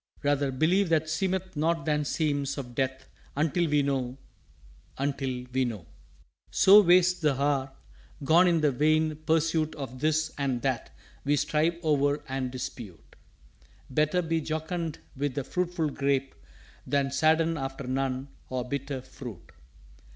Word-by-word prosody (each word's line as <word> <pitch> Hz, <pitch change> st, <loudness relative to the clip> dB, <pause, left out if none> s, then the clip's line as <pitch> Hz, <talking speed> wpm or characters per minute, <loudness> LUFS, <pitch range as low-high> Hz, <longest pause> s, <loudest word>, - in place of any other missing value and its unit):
Rather 145 Hz, -1 st, +1 dB
believe 170 Hz, +8 st, +2 dB
what 160 Hz, -1 st, +2 dB
seemeth 185 Hz, +3 st, -2 dB
not 165 Hz, +2 st, 0 dB
than 150 Hz, -1 st, +1 dB
seems 145 Hz, -2 st, -1 dB
Of 125 Hz, -3 st, -6 dB
Death 130 Hz, +1 st, -2 dB, 0.3 s
until 160 Hz, +3 st, +1 dB
we 145 Hz, -1 st, +3 dB
know 130 Hz, -2 st, -1 dB, 0.8 s
until 135 Hz, -2 st, -2 dB
we 130 Hz, 0 st, +2 dB
know." 110 Hz, -8 st, -4 dB, 0.7 s
"_So 205 Hz, +2 st, +7 dB
wastes 180 Hz, 0 st, +5 dB
the 150 Hz, -5 st, +1 dB
Hour 140 Hz, -2 st, 0 dB, 0.5 s
gone 170 Hz, +6 st, +5 dB
in 170 Hz, -2 st, +3 dB
the 150 Hz, -2 st, +3 dB
vain 155 Hz, +3 st, +2 dB
pursuit 160 Hz, 0 st, +1 dB
Of 130 Hz, -3 st, -7 dB
This 155 Hz, +2 st, +1 dB
and 130 Hz, -4 st, -1 dB
That 130 Hz, -3 st, -1 dB, 0.3 s
we 145 Hz, +1 st, +2 dB
strive 155 Hz, +3 st, +1 dB
o'er 145 Hz, -1 st, +2 dB
and 130 Hz, -1 st, -2 dB
dispute. 120 Hz, -7 st, -8 dB, 0.8 s
Better 155 Hz, +6 st, +2 dB
be 165 Hz, 0 st, 0 dB
jocund 160 Hz, +1 st, -3 dB, 0.2 s
with 140 Hz, -1 st, -2 dB
the 140 Hz, -, -1 dB
fruitful 175 Hz, 0 st, -1 dB
Grape 135 Hz, -1 st, 0 dB, 0.5 s
Than 140 Hz, -1 st, +1 dB
sadden 160 Hz, +3 st, +3 dB
after 135 Hz, -2 st, -5 dB
none, 130 Hz, +1 st, -2 dB, 0.2 s
or 125 Hz, -1 st, -3 dB
bitter, 140 Hz, 0 st, -3 dB
Fruit. 120 Hz, -11 st, -10 dB
145 Hz, 140 wpm, -28 LUFS, 135-160 Hz, 0.8 s, So